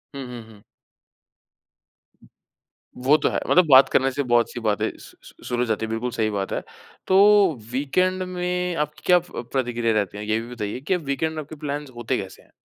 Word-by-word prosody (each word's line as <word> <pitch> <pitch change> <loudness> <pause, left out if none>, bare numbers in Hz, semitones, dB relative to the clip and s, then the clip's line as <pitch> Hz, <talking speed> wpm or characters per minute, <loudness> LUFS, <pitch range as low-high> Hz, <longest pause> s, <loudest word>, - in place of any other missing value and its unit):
हुँ, 135 -2 -6
हुँ, 120 -1 -8
हुँ। 105 -1 -18 2.3
वो 135 +4 +4
तो - - +1
है, - - -1
मतलब 180 -1 +5
बात 130 0 +8
करने 135 +1 +2
से 145 +2 -2
बहुत 120 -2 +2
सी 120 - -6
बातें 105 -3 0
स - - -14
स - - -17
शुरू 120 0 -1
हो - - +2
जाती 110 -1 -1
है, - - -7
बिल्कुल 115 +2 -2
सही 110 -2 0
बात 100 -2 -3
है। - - -2 0.5
तो 190 - +4 0.5
वीकेंड 185 +8 0
में 180 -1 -2
आपकी 150 +1 -21
क्या 180 -1 +6
प 165 -8 -8
प्रतिक्रिया 120 -3 0
रहती 105 -1 -1
है? 105 - -6
ये 110 +1 +2
भी 120 +2 -8
बताइए 105 +1 -4
कि 155 +7 0 0.2
वीकेंड 160 +3 -1
में - - -4
आपके 155 +2 -10
प्लान्स 145 -1 -5
होते 120 -1 -2
कैसे 95 - -11
हैं? - - -28
130 Hz, 205 wpm, -23 LUFS, 115-155 Hz, 2.3 s, बात